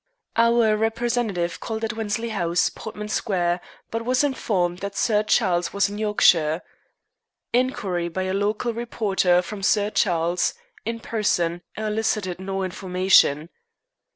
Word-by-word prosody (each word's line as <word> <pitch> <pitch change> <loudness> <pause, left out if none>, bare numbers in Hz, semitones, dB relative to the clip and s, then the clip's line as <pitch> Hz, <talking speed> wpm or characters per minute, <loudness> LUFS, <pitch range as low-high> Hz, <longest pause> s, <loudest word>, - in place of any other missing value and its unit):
"Our 230 -1 +4
representative 225 -5 -1
called 220 0 -4
at 225 +1 -1
Wensley 225 +1 -2
House, 175 -5 +1
Portman 210 -1 -7
Square, 180 -4 0 0.3
but 230 0 -2
was 255 +3 +2
informed 185 -10 0
that 200 0 -5
Sir 210 -3 +2
Charles 185 -5 +1
was 200 0 +2
in 205 +1 -6
Yorkshire." 175 -6 +3 0.9
Inquiry 200 -9 0
by 185 +3 -3
a 185 0 -2
local 210 +4 0
reporter 200 -6 +1
from 195 +3 -7
Sir 205 +1 +2
Charles 175 -2 +1 0.3
in 230 0 -3
person 175 -7 0 0.2
elicited 215 -4 -1
no 195 0 -3
information. 180 -4 +2
205 Hz, 125 wpm, -23 LUFS, 180-225 Hz, 0.9 s, Our